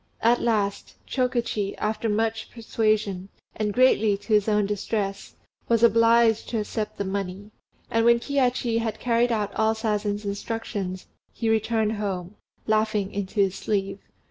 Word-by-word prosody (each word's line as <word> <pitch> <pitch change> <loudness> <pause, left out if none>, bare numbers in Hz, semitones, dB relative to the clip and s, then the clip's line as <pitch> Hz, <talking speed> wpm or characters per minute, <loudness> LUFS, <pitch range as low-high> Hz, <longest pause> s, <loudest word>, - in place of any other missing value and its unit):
At 235 +1 +4
last, 210 -4 -1
Chokichi, 240 -6 -1
after 215 +1 -1
much 220 +1 -1
persuasion, 215 -4 -1 0.3
and 210 -1 -1
greatly 220 -4 +3
to 210 +2 -3
his 210 -1 +3
own 210 -1 +2
distress, 200 -1 -3 0.3
was 230 0 +3
obliged 230 0 +4
to 230 - -1
accept 210 0 -4
the 200 - -2
money; 195 +1 -4 0.4
and 225 0 +2
when 235 0 +5
Kihachi 250 -3 0
had 220 -2 -3
carried 240 0 +2
out 210 -3 -1
all 220 0 +1
Sazen's 210 -2 -2
instructions, 200 -2 -4 0.3
he 225 -2 -1
returned 220 -1 +1
home, 190 -3 -3 0.3
laughing 215 -2 0
in 200 -1 -2
his 195 -1 +1
sleeve. 195 -1 -2
215 Hz, 145 wpm, -25 LUFS, 200-230 Hz, 0.4 s, when